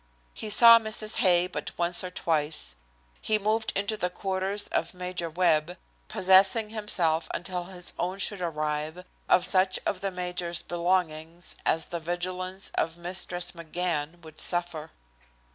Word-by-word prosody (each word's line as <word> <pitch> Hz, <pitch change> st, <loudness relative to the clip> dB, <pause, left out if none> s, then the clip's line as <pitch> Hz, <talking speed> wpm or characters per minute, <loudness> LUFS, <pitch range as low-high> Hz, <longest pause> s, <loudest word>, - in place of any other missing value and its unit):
He 215 Hz, -, -6 dB
saw 230 Hz, +2 st, +9 dB
Mrs. 215 Hz, -1 st, -4 dB
Hay 175 Hz, -1 st, +4 dB
but 180 Hz, -, -6 dB
once 175 Hz, +1 st, +2 dB
or 185 Hz, -, -4 dB
twice. 150 Hz, -, -2 dB, 0.5 s
He 215 Hz, -, +1 dB
moved 215 Hz, +2 st, 0 dB
into 200 Hz, +2 st, 0 dB
the 180 Hz, -, -1 dB
quarters 190 Hz, +2 st, -2 dB
of 170 Hz, +2 st, -2 dB
Major 180 Hz, -2 st, -4 dB
Webb, 170 Hz, 0 st, +1 dB, 0.3 s
possessing 195 Hz, +2 st, +4 dB
himself, 175 Hz, -7 st, +1 dB
until 180 Hz, 0 st, -3 dB
his 180 Hz, -1 st, -1 dB
own 180 Hz, +2 st, -2 dB
should 200 Hz, -1 st, -1 dB
arrive, 155 Hz, +1 st, -3 dB, 0.2 s
of 180 Hz, -, +4 dB
such 185 Hz, 0 st, +3 dB
of 185 Hz, -, -2 dB
the 195 Hz, -, -1 dB
major's 180 Hz, -2 st, -4 dB
belongings 170 Hz, -1 st, -2 dB
as 160 Hz, -, +1 dB
the 170 Hz, -, -3 dB
vigilance 185 Hz, +3 st, -4 dB
of 165 Hz, +1 st, -1 dB
Mistress 175 Hz, 0 st, -2 dB
McGann 170 Hz, -1 st, -3 dB
would 155 Hz, -1 st, -13 dB
suffer. 175 Hz, -3 st, -1 dB
180 Hz, 145 wpm, -27 LUFS, 170-190 Hz, 0.5 s, saw